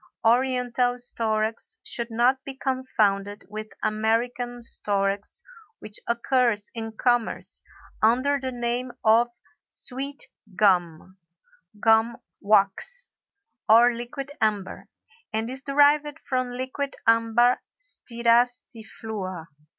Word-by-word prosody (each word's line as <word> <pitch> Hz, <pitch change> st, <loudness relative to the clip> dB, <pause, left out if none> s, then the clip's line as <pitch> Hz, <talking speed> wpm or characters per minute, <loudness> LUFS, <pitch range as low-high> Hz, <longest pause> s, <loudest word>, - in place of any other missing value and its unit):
Oriental 245 Hz, 0 st, +2 dB
storax 225 Hz, -, -1 dB
should 235 Hz, -1 st, -5 dB
not 245 Hz, +4 st, +2 dB
be 275 Hz, -1 st, -7 dB
confounded 210 Hz, -7 st, -1 dB
with 215 Hz, +1 st, -6 dB, 0.2 s
American 240 Hz, +3 st, 0 dB
storax 200 Hz, -, -1 dB, 0.3 s
which 210 Hz, 0 st, -7 dB
occurs 235 Hz, -2 st, +1 dB
in 225 Hz, -1 st, -5 dB
commerce 240 Hz, -2 st, 0 dB, 0.4 s
under 255 Hz, +6 st, +3 dB
the 260 Hz, -1 st, -4 dB
name 245 Hz, +1 st, -2 dB
of 225 Hz, +2 st, +5 dB, 0.4 s
Sweet 275 Hz, +2 st, -5 dB, 0.3 s
Gum, 180 Hz, -2 st, +1 dB, 0.6 s
Gum 225 Hz, +2 st, +3 dB, 0.2 s
Wax, 205 Hz, -, +1 dB, 0.6 s
or 235 Hz, +3 st, +7 dB
Liquidamber, 235 Hz, -4 st, -3 dB, 0.5 s
and 225 Hz, +2 st, -2 dB
is 265 Hz, +1 st, -5 dB
derived 290 Hz, +1 st, +3 dB
from 255 Hz, -5 st, -2 dB
Liquidambar 245 Hz, -2 st, +1 dB, 0.2 s
styraciflua. 230 Hz, -, -2 dB
235 Hz, 90 wpm, -25 LUFS, 220-255 Hz, 0.6 s, or